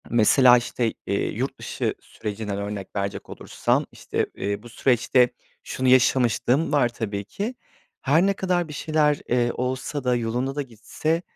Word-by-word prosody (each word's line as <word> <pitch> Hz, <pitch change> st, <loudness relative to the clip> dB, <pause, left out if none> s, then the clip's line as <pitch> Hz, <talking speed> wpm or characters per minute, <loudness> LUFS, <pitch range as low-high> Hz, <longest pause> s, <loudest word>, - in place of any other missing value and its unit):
Mesela, 120 Hz, +2 st, +6 dB
işte, 120 Hz, -1 st, -1 dB
eee, -, -, 0 dB
yurt -, -, -3 dB
dışı -, -, -2 dB
sürecinden 105 Hz, -1 st, -5 dB
örnek 100 Hz, -1 st, -5 dB
verecek 100 Hz, 0 st, -3 dB
olursam, -, -, -1 dB
işte, -, -, -2 dB
eee, 100 Hz, +1 st, -3 dB
bu 120 Hz, -, -11 dB
süreçte 125 Hz, +1 st, +3 dB, 0.3 s
şunu 130 Hz, -, -2 dB
yaşamışlığım 130 Hz, +2 st, +3 dB
var 140 Hz, -5 st, +3 dB
tabii 100 Hz, -4 st, -4 dB
ki. 210 Hz, -, -4 dB, 0.5 s
Her 160 Hz, +7 st, +3 dB
ne 200 Hz, -, +3 dB
kadar 180 Hz, -3 st, 0 dB
bir 150 Hz, -, -8 dB
şeyler, 150 Hz, 0 st, +1 dB
eee, 120 Hz, -1 st, +2 dB
olsa 130 Hz, +3 st, -3 dB
da, 125 Hz, -1 st, +2 dB
yolunda 120 Hz, +3 st, -2 dB
da 145 Hz, -, -1 dB
gitse, 140 Hz, +7 st, -3 dB
125 Hz, 155 wpm, -24 LUFS, 115-145 Hz, 0.5 s, Mesela